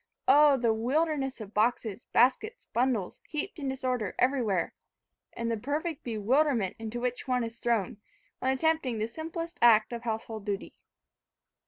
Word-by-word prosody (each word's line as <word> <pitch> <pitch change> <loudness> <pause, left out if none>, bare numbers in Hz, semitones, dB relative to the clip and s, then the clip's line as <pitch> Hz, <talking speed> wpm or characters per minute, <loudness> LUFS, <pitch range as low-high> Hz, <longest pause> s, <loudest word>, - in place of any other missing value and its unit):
Oh! 285 +1 +7
the 235 -3 +2
wilderness 270 +3 0
of 210 -1 -9
boxes, 220 0 0
baskets, 270 - +2
bundles, 235 -6 0
heaped 310 +3 -4
in 275 -2 -2
disorder 255 -6 -2
everywhere! 240 -9 +1 0.6
and 230 0 -2
the 225 - 0
perfect 300 +6 -3
bewilderment 235 -1 +1
into 225 +1 -4
which 250 +2 -3
one 250 -1 +1
is 230 0 -6
thrown, 225 -5 0 0.4
when 260 - +1
attempting 275 -3 +1
the 215 +1 -1
simplest 330 +5 -6
act 230 -1 +6
of 235 - -4
household 225 -2 -4
duty. 200 -1 -4
245 Hz, 145 wpm, -29 LUFS, 225-280 Hz, 0.6 s, Oh